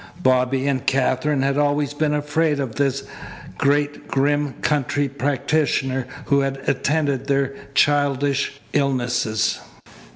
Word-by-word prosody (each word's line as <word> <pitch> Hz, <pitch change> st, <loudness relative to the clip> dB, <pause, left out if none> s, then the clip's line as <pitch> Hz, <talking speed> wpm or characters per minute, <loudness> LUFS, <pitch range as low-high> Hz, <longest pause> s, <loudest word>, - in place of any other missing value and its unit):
Bobby 130 Hz, +1 st, +2 dB
and 130 Hz, -3 st, 0 dB
Katherine 135 Hz, +2 st, +1 dB
had 140 Hz, +1 st, +1 dB
always 145 Hz, -1 st, +1 dB
been 150 Hz, 0 st, 0 dB
afraid 150 Hz, 0 st, 0 dB
of 130 Hz, -5 st, -3 dB
this 135 Hz, +2 st, 0 dB, 0.6 s
great, 145 Hz, +1 st, +1 dB
grim 145 Hz, 0 st, +1 dB
country 145 Hz, -1 st, 0 dB
practitioner 140 Hz, -1 st, 0 dB, 0.2 s
who 140 Hz, -1 st, +3 dB
had 135 Hz, 0 st, -1 dB
attended 145 Hz, -3 st, 0 dB
their 140 Hz, -1 st, +1 dB, 0.2 s
childish 140 Hz, -1 st, +1 dB
illnesses. 120 Hz, -5 st, 0 dB
140 Hz, 110 wpm, -22 LUFS, 135-145 Hz, 0.6 s, who